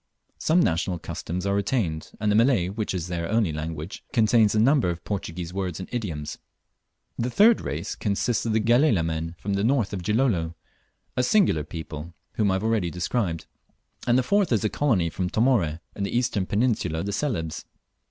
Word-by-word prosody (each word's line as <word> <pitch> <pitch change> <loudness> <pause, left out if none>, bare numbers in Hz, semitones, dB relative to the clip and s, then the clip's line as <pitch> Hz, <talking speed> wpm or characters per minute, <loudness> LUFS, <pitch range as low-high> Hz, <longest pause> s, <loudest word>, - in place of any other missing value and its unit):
Some 170 +3 +3
national 85 - 0
customs 90 +2 -5
are 100 - +1
retained, 100 -6 -1
and 105 0 +1
the - - +3
Malay, 115 -6 +3
which 105 +2 -3
is 90 -3 -2
their 85 -2 -3
only 110 -6 +2
language, 80 +2 -5
contains 110 -2 +4
a - - +3
large 110 - +5
number 135 -8 +3
of 85 -1 -4
Portuguese 90 -3 -4
words 95 -3 -3
and 95 - -6
idioms. 80 -11 -4 0.8
The 120 - 0
third 215 - +5
race 75 +4 -4
consists 105 +2 0
of 110 - 0
the 110 - +3
Galela 115 - +3
men 80 +1 -3
from 100 +4 -3
the 100 0 0
north 120 -4 +1
of 95 - -3
Gilolo, 95 -5 +1 0.6
a - - +2
singular 125 - +3
people, 80 +1 -7 0.2
whom 105 -2 +1
I 95 - +2
have 95 - -2
already 110 -6 +1
described; 90 -1 -2 0.6
and 120 +1 +4
the 130 - +3
fourth 200 +2 +2
is 110 -3 +2
a 110 - +2
colony 100 - +1
from 90 +1 -2
Tomóre, 100 - +2
in - - -6
the 100 +4 -1
eastern 115 -6 0
peninsula 100 -8 0
of 100 +1 -3
Celebes. 95 - -2
100 Hz, 190 wpm, -25 LUFS, 85-115 Hz, 0.8 s, large